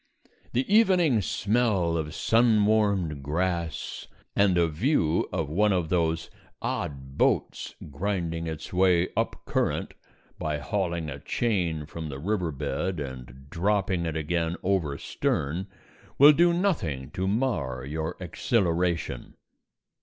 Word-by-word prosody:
The 125 +2 +1
evening 180 - +5
smell 100 -4 +1
of 80 -1 -3
sun 115 -2 +3
warmed 100 -9 +1
grass 85 +2 -2 0.3
and 100 -3 +4
a 85 -1 +4
view 85 - +1
of 80 - -1
one 105 +8 +2
of 90 -4 0
those 85 -2 0 0.3
odd 65 -1 -4
boats - - +1 0.2
grinding 85 0 -2
its 80 +1 -6
way 90 -1 +3
up - - -2
current - - -1 0.5
by 75 -1 -1
hauling 85 -1 -2
a 70 - -7
chain 85 - -1
from 80 +1 -6
the 70 - -5
river 90 +2 -1
bed 85 +5 -2
and 65 -1 -8
dropping 95 -1 0
it 80 0 -2
again 80 +2 -1
over 90 -7 0
stern 80 +8 -2 0.5
will 145 +2 +9
do 170 +3 +4
nothing 95 - -1
to 95 +3 -2
mar 90 - -1
your 80 +4 -4
exhilaration. 85 - -1
85 Hz, 125 wpm, -27 LUFS, 80-105 Hz, 0.5 s, will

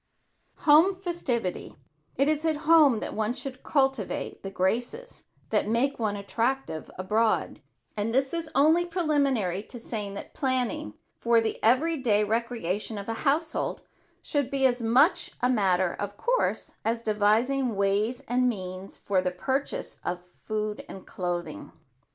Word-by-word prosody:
[Sidenote: - - -18
HOME 320 +6 +6
FESTIVITY] 320 - -3 0.4
It 275 +2 +2
is 305 0 +1
at 320 -1 +2
home 300 -8 +6
that - - -4
one 220 +2 -1
should 260 0 -6
cultivate 270 -7 -1
the 195 - -5
graces 240 - -2 0.3
that - - +1
make 245 +6 +1
one 215 -3 0
attractive 230 -2 -2
abroad; 215 +4 0 0.3
and 215 +1 -1
this 265 +4 +1
is 335 -2 -3
only 315 +5 +5
preliminary 280 - 0
to 240 - -10
saying 210 -4 -5
that - - -8
planning 255 - 0 0.2
for 235 0 +4
the 225 -1 -3
every 295 +9 +3
day 215 -6 +2
recreation 220 -2 -2
of 200 - -6
a - - 0 0.2
household 315 +3 -1 0.4
should 285 -3 -1
be 275 -1 +1
as 245 -1 +2
much 255 - +4
a 250 - +2
matter 190 -6 +2
of 205 0 -4
course - - 0
as 230 +1 -1
devising 225 +4 +2
ways 205 +6 +1
and 250 +1 +2
means 185 -3 -6
for 190 -2 0
the 185 - 0
purchase 265 +10 -3
of 180 0 -4
food 215 +3 -4
and 190 - -9
clothing. 175 - -4
235 Hz, 150 wpm, -27 LUFS, 205-275 Hz, 0.4 s, HOME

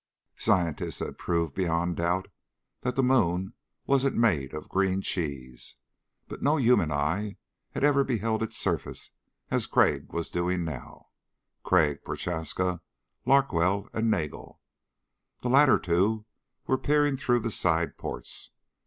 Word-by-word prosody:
Scientists 90 -8 0
had - - -5
proved 85 -4 0
beyond 85 -1 0
doubt 90 +2 0 0.5
that 125 0 -2
the 135 - +2
moon 95 -6 +2 0.3
wasn't 135 0 +2
made 80 - +2
of 75 - -7
green 95 0 +1
cheese. 70 -10 -3 0.5
But - - -8
no 150 +3 +3
human 120 - +3
eye 80 +9 -1 0.4
had - - -3
ever 140 -1 +5
beheld 115 -3 -1
its 110 - -2
surface - - -2 0.4
as - - +1
Crag - - +2
was 85 -1 -3
doing 90 0 0
now 70 -7 -8 0.5
Crag, 80 -6 +2
Prochaska, 90 +1 -2 0.5
Larkwell 100 -8 +3
and 115 0 +1
Nagel. 75 -8 -3 0.8
The 125 - 0
latter 135 +1 +6
two 100 +6 +1 0.4
were 130 - +1
peering 145 -1 +2
through 120 -2 +1
the 115 0 -2
side 85 -3 +1
ports. - - -6
95 Hz, 130 wpm, -28 LUFS, 85-120 Hz, 0.8 s, latter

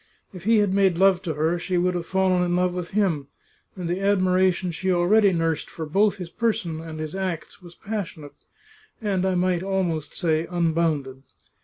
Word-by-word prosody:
If 180 -1 -10
he 225 +1 +4
had 205 -2 +2
made 195 -3 +3
love 190 -1 +4
to 165 -6 -3
her 160 +3 0
she 180 +1 -1
would 180 +1 +1
have 175 -1 -4
fallen 190 -1 +2
in 175 0 +1
love 180 0 +1
with 180 -1 -4
him, 180 -9 0 0.5
and 180 -3 -5
the 175 +2 -1
admiration 185 -2 +2
she 185 +3 -1
already 195 +4 +4
nursed 165 -3 -1
for 160 - -6
both 200 +7 +2
his 180 -3 -7
person 175 -8 -1
and 160 -1 -8
his 155 -1 -5
acts 185 -4 -4
was 175 -1 -13
passionate, 185 -9 -6 0.7
and 200 -4 -1
I 185 - +1
might 180 -1 +1
almost 180 -6 -2
say 160 -2 0
unbounded. 160 -6 0
180 Hz, 185 wpm, -24 LUFS, 165-190 Hz, 0.7 s, he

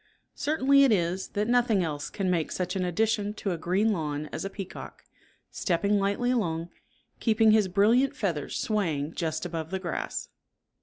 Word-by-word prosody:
Certain 285 -2 0
it 275 -2 +7
is, 180 -1 0
that 210 +1 -2
nothing 235 -5 +3
else 150 -3 -3
can 195 -2 -3
make 170 -4 0
such 180 +1 -2
an 190 - 0
addition 210 +3 0
to 200 - -3
a 175 - -2
green 190 +7 +1
lawn 150 -4 -3
as - - -4
a 195 - -3
peacock, 195 -1 -8 0.5
stepping 200 +3 +1
lightly 200 +5 0
along, 170 -8 -1 0.5
keeping 220 -1 +4
his 215 -2 +4
brilliant 220 +8 +3
feathers 170 -8 -2
swaying 165 -8 -1
just 160 0 -2
above 165 -2 -4
the 190 - -2
grass. 180 -3 -4
195 Hz, 165 wpm, -27 LUFS, 170-220 Hz, 0.5 s, it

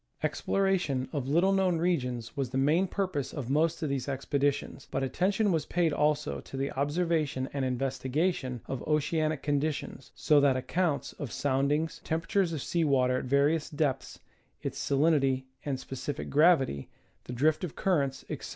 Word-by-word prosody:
Exploration 180 -10 0
of 140 -4 -2
little 175 +7 +3
known 190 -3 +2
regions 125 -10 -1
was 135 -3 -2
the 130 - -3
main 155 +8 +3
purpose 180 -8 -2
of 135 -4 -5
most 160 +3 +1
of 155 - -1
these 135 -1 -2
expeditions, 140 0 -1
but - - -1
attention 195 +9 +1
was 160 -3 0
paid 170 -3 +1
also 150 0 +1
to 135 - -9
the 135 +1 -1
ob 140 +2 -1
servation 155 -5 0
and 140 -1 -1
investigation 130 +1 -1
of 135 - -4
oceanic 155 0 0
conditions, 145 -3 -2
so 150 -2 +4
that 135 -2 +4
accounts 160 +3 -1
of 140 -6 -5
soundings, 145 +3 0
temperatures 165 +3 0
of 155 -5 -3
sea 170 -1 0
water 130 -3 +2
at - - -6
various 145 +4 +2
depths, 145 -3 -2 0.5
its - - -4
sa 140 - 0
linity 135 -3 +3 0.2
and 135 -3 -2
specific 135 +2 -5
gravity, 140 - +3 0.4
the 125 - -6
drift 155 +7 +2
of 175 - -4
currents, 140 -8 0
etc. - - -6
145 Hz, 165 wpm, -29 LUFS, 135-165 Hz, 0.5 s, so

